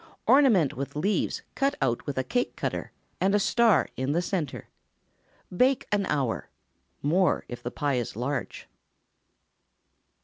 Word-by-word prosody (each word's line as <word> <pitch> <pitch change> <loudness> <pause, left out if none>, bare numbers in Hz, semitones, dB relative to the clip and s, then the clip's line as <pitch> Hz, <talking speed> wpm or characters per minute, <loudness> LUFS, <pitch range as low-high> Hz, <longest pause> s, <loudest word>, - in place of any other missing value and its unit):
Ornament 235 - +5
with 140 +2 -5
leaves 195 +8 0
cut 275 +1 +1
out 120 - -1
with 145 - -3
a 130 - +1
cake 245 - -1
cutter, - - -3 0.3
and 195 +2 +2
a - - +4
star 225 -2 +3
in 130 +2 -1
the 170 - +2
centre. 170 -7 -3 0.9
Bake 255 +6 +3
an 200 -2 +1
hour—more, 145 - -1
if 120 - -7
the 120 - -4
pie 140 -1 -1
is 120 - -5
large. 130 +5 -4
155 Hz, 135 wpm, -27 LUFS, 130-205 Hz, 0.9 s, Ornament